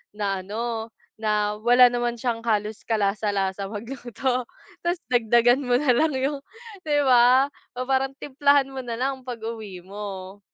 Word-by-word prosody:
na 200 -2 -1
ano, 225 +2 -4 0.3
na 210 -1 0
wala 245 +1 +7
naman 240 -1 -2
siyang 230 -1 -2
halos 215 -2 -1
kalasa-lasa 200 -2 -1
magluto, 245 +3 -3 0.4
tas 345 0 0
dagdagan 240 +2 +3
mo 245 0 +2
nalang 295 +2 +3
yung 280 +2 -1 0.5
di 295 -2 +1
ba? 250 +2 +6 0.4
Parang 270 0 +1
timplahan 280 0 +2
mo 265 -1 -6
na 235 -1 -5
lang 265 0 -2
pag 245 -2 -6
uwi 220 -5 -6
mo. 195 0 -8
235 Hz, 135 wpm, -24 LUFS, 210-260 Hz, 0.5 s, wala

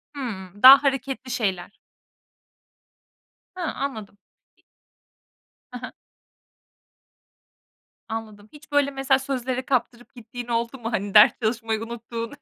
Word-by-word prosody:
Hımm, 205 -7 -7
daha 270 +2 +10
hareketli 265 -1 -2
şeyler. 200 -6 -2 1.8
Hıı 365 - -5
anladım. 220 -7 -6 1.5
Hı 250 - -6
hı. - - -10 2.2
Anladım. 215 -2 -7
Hiç 295 0 -16
böyle 285 -1 +2
mesela 270 0 +1
sözlere 255 -1 -3
kaptırıp 245 -2 -2
gittiğin 240 0 -9
oldu 235 +2 -2
mu? 230 0 -5
Hani 200 -3 -3
ders 210 0 +8
çalışmayı 225 -1 -1
unuttuğun? 230 +1 -7
235 Hz, 100 wpm, -24 LUFS, 220-265 Hz, 2.2 s, daha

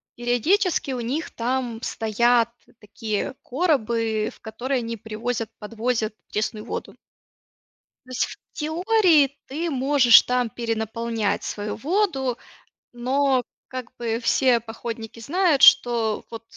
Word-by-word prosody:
периодически 280 - +1
у 250 -2 -3
них 275 +8 -3
там 240 -1 -2
стоят 235 +1 +2 0.3
такие 210 +3 -4
коробы, 230 -8 0
в - - -21
которые 245 +4 -3
они 230 -1 -4
привозят, 225 +1 -4
подвозят 225 0 -2 0.2
пресную 215 0 -2
воду. 235 - -6 1.1
То - - -19
есть 255 - +1
в - - -10 0.2
теории 320 -3 +3
ты 320 +5 -3
можешь 270 -3 +6
там 250 -1 0
перенаполнять 225 -1 -2
свою 210 0 -4
воду, 275 - 0 0.6
но 260 +1 +1 0.2
как 255 -1 -8
бы 230 -1 -2
все 250 0 +3
походники 225 0 -7
знают, 310 +3 +1
что 230 -5 +5
вот 230 -1 -8
240 Hz, 115 wpm, -24 LUFS, 225-270 Hz, 1.1 s, можешь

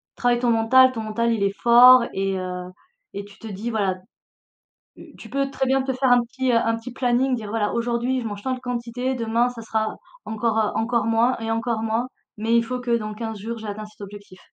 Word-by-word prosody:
travaille 245 -1 +1
ton 240 -1 +1
mental. 245 +3 +5
Ton 230 -3 -5
mental, 230 +2 -1
il 215 -3 -1
est 200 - +2
fort 240 +2 +7
et 195 0 -1
heu, 180 -1 -5 0.5
et 200 - -5
tu 200 -1 -17
te 225 - -9
dis: 210 +3 -5
«Voilà». 200 -4 0 1.0
U - - -15
tu - - -11
peux 275 0 -1
très 265 -1 -2
bien 265 +1 +2
te 265 0 -2
faire 260 0 +1
un 245 - +6
petit, 260 +2 -2
heu, - - +2
un 230 0 +1
petit 230 +3 -9
planning, 255 +1 +1
dire: 215 -3 -7
«Voilà, 215 -1 -1
aujourd'hui, 240 +2 -1
je 230 - -4
mange 205 -1 -7
tant 260 - -1
de 255 - -5
quantités, 245 +1 -3
demain 235 +1 +1
ça 235 -2 -9
sera 220 -1 -2 0.3
encore, 220 0 -1
heu, 215 - +1
encore 235 +1 0
moins 230 +3 +2
et 225 0 -4
encore 225 0 -1
moins, 225 +2 -1 0.3
mais 225 +2 +1
il 235 - +4
faut 250 +2 -4
que, 240 -1 +1
dans 215 -1 -5
15 225 -1 -5
jours, 230 +3 -5
j'ai 220 -1 -8
atteint 210 +1 -5
cet 215 0 -17
objectif». 200 -2 -11
230 Hz, 235 wpm, -23 LUFS, 215-245 Hz, 1.0 s, fort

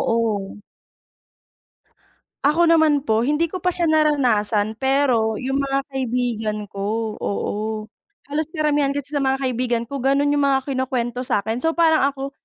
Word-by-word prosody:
Oo. 210 -4 -2 1.9
Ako 330 +4 +4
naman 315 -3 +4
po, 225 -3 +1
hindi 300 +3 +1
ko 370 - -4
pa 360 0 -1
siya 340 -2 +1
naranasan, 230 -9 +2
pero 265 -5 +2
yung 265 +4 -2
mga 275 0 0
kaibigan 240 -5 -2
ko, 215 +2 -3
oo. 200 - -2 0.8
Halos 305 +2 -1
karamihan 295 -2 +1
kasi 285 0 -5
sa 295 - -1
mga 270 0 0
kaibigan 245 -2 0
ko 280 - -4
gano'n 275 +2 +2
yung 290 -1 +2
mga 270 -1 +2
kinukwento 255 -2 -2
sa'kin. 220 -2 -1
So, 325 +5 0
parang 320 -4 +4
ako, 275 0 -6
270 Hz, 145 wpm, -21 LUFS, 230-290 Hz, 1.9 s, Ako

